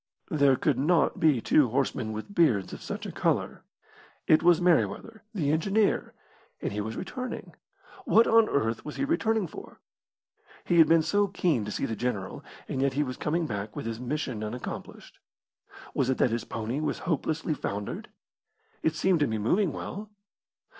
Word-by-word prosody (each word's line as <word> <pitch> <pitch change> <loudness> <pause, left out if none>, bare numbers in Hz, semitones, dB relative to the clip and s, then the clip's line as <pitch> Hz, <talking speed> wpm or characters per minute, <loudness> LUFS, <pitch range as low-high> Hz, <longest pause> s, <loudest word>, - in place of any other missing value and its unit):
There 140 -3 +4
could 135 -1 0
not 160 +2 +2
be 150 -7 +3
two 140 0 +4
horsemen 125 -2 -1
with 110 - -6
beards 120 - +2
of - - -8
such - - -5
a - - -5
colour. - - -1 0.6
It 155 - +5
was 175 -1 +5
Merryweather, 175 - +1
the 160 -10 0
engineer, 195 +7 +1 0.4
and - - -3
he 105 - -2
was 110 +2 -5
returning. 255 +7 -6 0.5
What 230 - +5
on 225 -1 +5
earth 115 -4 0
was 150 - -7
he - - -1
returning 225 - +1
for? - - -11 0.9
He 170 - +3
had 160 - +8
been 165 0 +5
so 205 +6 +2
keen 170 - 0
to 105 - -5
see - - -2
the 115 - -3
general, 105 -6 -3 0.2
and 130 - -2
yet 135 0 +2
he 145 +2 +1
was 130 -2 -4
coming 165 +5 -1
back 105 -4 -5
with - - -5
his 115 0 -4
mission 125 -3 -3
unaccomplished. 115 +4 -7 0.7
Was 130 - +1
it 130 - +1
that 125 - +2
his 115 0 -2
pony 115 +5 -3
was 155 -1 -1
hopelessly 160 0 -1
foundered? 100 -7 -5 0.7
It 160 0 +1
seemed 180 0 +2
to 145 - +2
be 110 - -1
moving 175 - +1
well. 205 +8 -6
150 Hz, 175 wpm, -28 LUFS, 115-175 Hz, 0.9 s, had